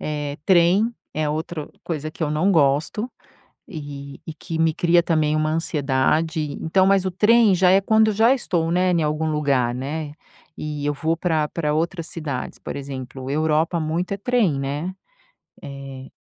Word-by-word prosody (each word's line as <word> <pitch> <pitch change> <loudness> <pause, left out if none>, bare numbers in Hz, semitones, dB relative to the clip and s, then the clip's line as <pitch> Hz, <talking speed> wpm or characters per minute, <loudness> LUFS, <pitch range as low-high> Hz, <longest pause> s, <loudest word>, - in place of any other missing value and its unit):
Eh, 145 -1 -3
trem 190 +6 +4 0.2
é 155 0 0
outra 155 0 -4 0.2
coisa 155 -2 -3
que 160 - -7
eu 150 - 0
não 155 +6 +2
gosto 155 - +1 0.6
e 145 -6 -8
e 160 - -6
que 165 +1 -6
me 160 -1 +2
cria 175 +1 +3
também 155 -3 +1
uma 155 0 +1
ansiedade. 155 +1 0 0.2
Então, 185 +4 +2
mas 195 -1 +3
o - - 0
trem 215 +2 +5
já 180 0 +4
é 190 +1 +5
quando 220 +2 +3
já 225 +5 +4
estou, 170 -10 -1
né, 180 +1 +2
em 170 -2 +2
algum 150 +1 -1
lugar, 140 -5 +1
né, 145 +4 -4 0.5
e 150 -1 -4
eu 145 - +1
vou 160 +3 -1
pra 160 -3 0
pra 150 -2 -2
outras 165 +1 -2
cidades, 145 -6 -5
por - - -7
exemplo, 135 -1 -7
Europa 155 +3 +1
muito 165 +4 -2
é - - -6
trem, 205 - +1
né, 145 +6 -3 0.7
eh, 135 -1 -8
160 Hz, 170 wpm, -22 LUFS, 145-180 Hz, 0.7 s, trem